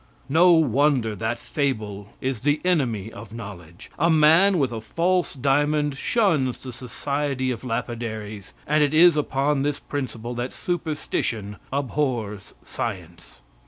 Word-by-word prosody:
No 175 +5 +6
wonder 140 -6 +3
that 110 +4 -2
fable 105 -8 -3
is 130 -3 -2
the 145 +5 +1
enemy 120 - 0
of 115 -1 -10
knowledge. 95 -5 -10
A 165 +3 +3
man 165 +5 +5
with 135 -6 +1
a 115 -1 -5
false 175 +7 0
diamond 145 +2 +1
shuns 150 - +1
the 130 -2 -7
society 135 +1 -2
of 120 - -5
lapidaries, 110 -4 -4
and 150 +1 +2
it 145 +1 +1
is 170 0 +7
upon 140 -1 +1
this 145 0 0
principle 120 -4 -5
that 120 +1 -4
superstition 150 - -3
abhors 130 -7 -2
science. 90 -6 -6
130 Hz, 130 wpm, -24 LUFS, 110-150 Hz, -, is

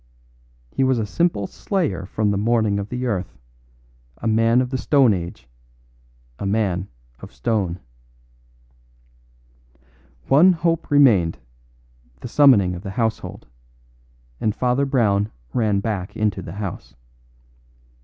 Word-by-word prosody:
He 135 - 0
was 130 -1 +2
a 110 - -1
simple 170 - 0
slayer 105 - -3
from 105 +1 0
the - - 0
morning 110 -2 +1
of 100 +1 -5
the 125 +1 -3
earth; 100 -7 -3 0.8
a - - -9
man 115 +2 +3
of 125 0 -1
the 130 - -1
stone 135 -6 +4
age 85 -6 -6 0.9
a - - -4
man 95 -3 0 0.3
of - - -11
stone. 90 - -2 2.5
One 170 +7 +6
hope 165 -1 -1
remained, 115 - +4 0.8
the - - -6
summoning 115 -9 +5
of 90 - -7
the 100 - -7
household; 110 +2 -3 0.9
and 110 -2 -1
Father 125 +3 +1
Brown 110 -6 +1 0.2
ran 105 -4 +1
back 100 -4 -4
into 105 -3 0
the 80 - -8
house. 100 -2 -7
110 Hz, 125 wpm, -21 LUFS, 100-130 Hz, 2.5 s, One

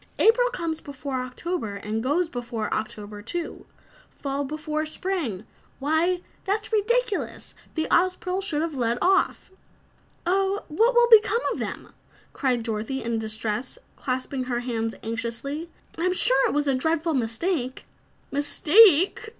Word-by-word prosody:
"April - - +5
comes 335 -9 -3
before 275 -2 -4
October 255 - -4
and 210 +2 -3
goes 300 +8 +1
before 240 -5 -4
October, 210 -1 -4
too. 335 +10 -5 0.4
Fall 280 0 -3
before 305 +2 -3
spring 310 - -3 0.3
why, 320 +5 +1 0.2
that's 420 +3 -2
ridiculous! 475 +1 0 0.2
The 315 -1 0
Ozpril 365 +1 +2
should 320 -6 0
have 330 -1 -2
led 240 -3 0
off!" 380 0 +2 0.7
"Oh, 390 +3 +1
what 455 +11 +3
will 480 0 +6
become 445 +1 +7
of - - -6
them?" - - -5 0.4
cried 250 -4 0
Dorothy 225 +4 -3
in 230 0 -1
distress, 220 - -3 0.2
clasping 255 0 -3
her 245 -1 -1
hands 225 -2 -2
anxiously. 235 +8 -3 0.3
"I'm 365 +2 +2
sure 270 -6 +4
it - - -2
was 295 0 +2
a 275 - +2
dreadful 320 +5 0
mistake." 255 +3 -1 0.5
"Mistake!" 340 +8 +5
290 Hz, 135 wpm, -25 LUFS, 240-365 Hz, 0.7 s, become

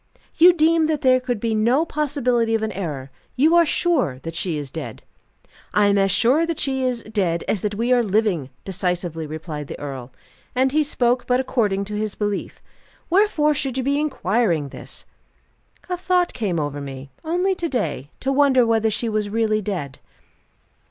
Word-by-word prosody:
"You 350 +2 +7
deem 325 -1 +3
that 310 -2 -1
there 255 -1 +4
could 250 -3 -3
be 225 +1 -1
no 240 +8 +2
possibility 255 -7 0
of 220 - -1
an 220 - -1
error? 145 -8 -5 0.2
You 310 +6 +4
are 340 -1 +5
sure 290 - +1
that 165 - -5
she 165 -1 -1
is 145 -3 -6
dead?" - - -7 0.7
"I 210 - +5
am 200 0 +3
as 195 0 +3
sure 250 - +3
that 335 -2 -2
she 265 -1 -1
is 250 -2 -1
dead 190 -6 -1
as 205 - 0
that 210 -1 -2
we 235 +4 +1
are 245 - +4
living," 200 - 0 0.2
decisively 180 -4 -2
replied 155 -1 -6
the - - -7
earl: 135 -3 -7 0.4
and 260 +1 +2
he 310 +2 +3
spoke 250 -4 0
but 250 0 +2
according 210 -7 0
to 210 - -7
his 215 -1 -3
belief. 205 -2 -3 0.5
"Wherefore 350 -6 +3
should 270 -2 -2
you 260 - 0
be 280 +2 +1
inquiring 215 - 0
this?" - - -9 0.8
"A 360 -1 -2
thought 360 -1 +1
came 190 -8 -1
over 145 -1 -3
me 135 0 -8
only 355 +4 +1
to 345 -2 -3
day 205 - -2
to 270 - 0
wonder 270 -3 +4
whether 225 -1 +2
she 230 +2 -2
was 215 -2 -1
really 215 0 +1
dead." 180 -10 -4
225 Hz, 185 wpm, -22 LUFS, 185-275 Hz, 0.8 s, You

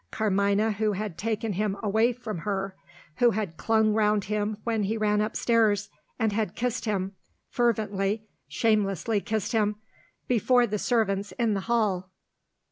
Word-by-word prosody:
Carmina, 200 0 +1
who 210 0 0
had 205 -2 -4
taken 220 +2 -2
him 200 +1 -1
away 220 +3 +3
from 230 -6 -6
her; 195 +1 -2 0.4
who 245 - +5
had 205 -6 -2
clung 220 +3 +2
round 210 -1 +2
him 210 +1 -2
when 225 -2 0
he 210 +3 -1
ran 210 -1 +2
upstairs, 215 -1 +1 0.3
and 220 -2 +1
had 210 -3 -1
kissed 245 0 -2
him 195 -3 -1 0.4
fervently, 215 -3 0 0.2
shamelessly 210 -1 +1
kissed 220 -3 -2
him 210 -3 +1 0.5
before 245 +1 +3
the 210 -2 -2
servants 205 -4 0
in 230 -3 +1
the 200 - 0
hall! 200 -6 +1
215 Hz, 145 wpm, -27 LUFS, 200-225 Hz, 0.5 s, who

